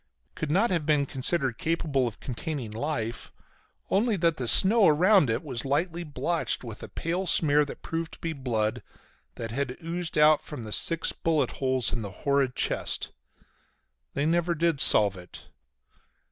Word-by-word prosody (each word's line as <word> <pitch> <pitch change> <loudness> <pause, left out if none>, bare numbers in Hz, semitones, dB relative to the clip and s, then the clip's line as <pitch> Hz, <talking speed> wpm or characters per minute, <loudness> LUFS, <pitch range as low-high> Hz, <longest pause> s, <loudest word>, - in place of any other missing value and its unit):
Could 160 - -5
not 195 +9 +2
have 170 -4 0
been 150 -2 +2
considered 135 -1 -1
capable 160 -6 0
of 110 - -8
containing 130 -2 -5
life 115 -2 -4 0.6
only 215 +1 +2
that 165 -2 +1
the 125 - -2
snow 205 - +7
around 175 - +4
it 115 +3 -1
was 130 -6 -5
lightly 165 +5 -1
blotched 155 +1 -2
with 115 -3 -9
a - - -7
pale 180 +3 -3
smear 150 -3 +3
that 140 - -10
proved 165 0 -4
to - - -11
be 165 -1 -4
blood, 115 -6 -2 0.5
that 115 -1 -6
had 130 +1 -3
oozed 170 0 -4
out 150 0 +5
from 145 -6 -8
the 110 -1 -7
six 165 -1 +1
bullet 155 -6 0
holes 130 -2 +1
in 120 - -3
the 100 - -6 0.2
horrid 140 -2 +1
chest. - - -1 1.0
They 140 - 0
never 170 +1 +1
did 165 -3 0
solve 100 -2 +6
it. 90 -1 -12
150 Hz, 165 wpm, -27 LUFS, 125-165 Hz, 1.0 s, snow